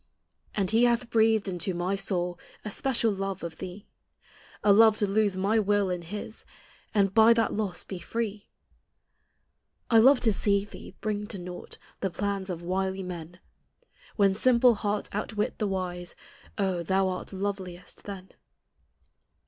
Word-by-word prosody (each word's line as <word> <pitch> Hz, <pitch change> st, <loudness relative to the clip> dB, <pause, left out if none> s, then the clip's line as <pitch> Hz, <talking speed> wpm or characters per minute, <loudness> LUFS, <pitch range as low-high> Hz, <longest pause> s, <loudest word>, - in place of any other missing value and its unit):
And 195 Hz, -2 st, +1 dB
he 230 Hz, +2 st, +5 dB
hath 240 Hz, 0 st, +1 dB
breathed 220 Hz, -2 st, +3 dB
into 180 Hz, 0 st, -2 dB
my 180 Hz, +3 st, -1 dB
soul 180 Hz, -3 st, -1 dB, 0.3 s
A 210 Hz, -, -3 dB
special 235 Hz, -2 st, +1 dB
love 195 Hz, -2 st, -4 dB
of 165 Hz, -2 st, -6 dB
thee, 190 Hz, +3 st, -8 dB, 0.8 s
A 205 Hz, -, +6 dB
love 220 Hz, +1 st, +6 dB
to 210 Hz, -, +2 dB
lose 200 Hz, -1 st, +1 dB
my 205 Hz, +4 st, +2 dB
will 205 Hz, -2 st, +2 dB
in 180 Hz, -1 st, -2 dB
his 205 Hz, +5 st, -7 dB, 0.5 s
And 195 Hz, -2 st, +2 dB
bv 225 Hz, +2 st, +7 dB
that 230 Hz, -1 st, +1 dB
loss 195 Hz, -5 st, -1 dB
be 190 Hz, -, -7 dB
free. 215 Hz, 0 st, -4 dB, 1.4 s
I 225 Hz, -, +7 dB
love 260 Hz, +3 st, +7 dB
to 220 Hz, -3 st, +3 dB
see 200 Hz, 0 st, +2 dB
thee 200 Hz, -, -12 dB
bring 210 Hz, -1 st, -2 dB
to 210 Hz, -, -6 dB
naught 180 Hz, 0 st, -8 dB, 0.2 s
The 195 Hz, -, -1 dB
plans 195 Hz, +2 st, -3 dB
of 175 Hz, -2 st, -5 dB
wily 190 Hz, +2 st, -1 dB
men; 175 Hz, -1 st, -8 dB, 0.7 s
When 200 Hz, -2 st, +4 dB
simple 245 Hz, +3 st, +5 dB
hearts 205 Hz, -1 st, -2 dB
outwit 210 Hz, +1 st, -2 dB
the 210 Hz, -, 0 dB
wise, 180 Hz, -2 st, -4 dB, 0.4 s
Oh? 190 Hz, -4 st, 0 dB
thou 190 Hz, +3 st, +1 dB
art 185 Hz, -1 st, -4 dB
loveliest 190 Hz, -2 st, -5 dB
then. 195 Hz, -2 st, -8 dB
200 Hz, 155 wpm, -28 LUFS, 185-215 Hz, 1.4 s, bv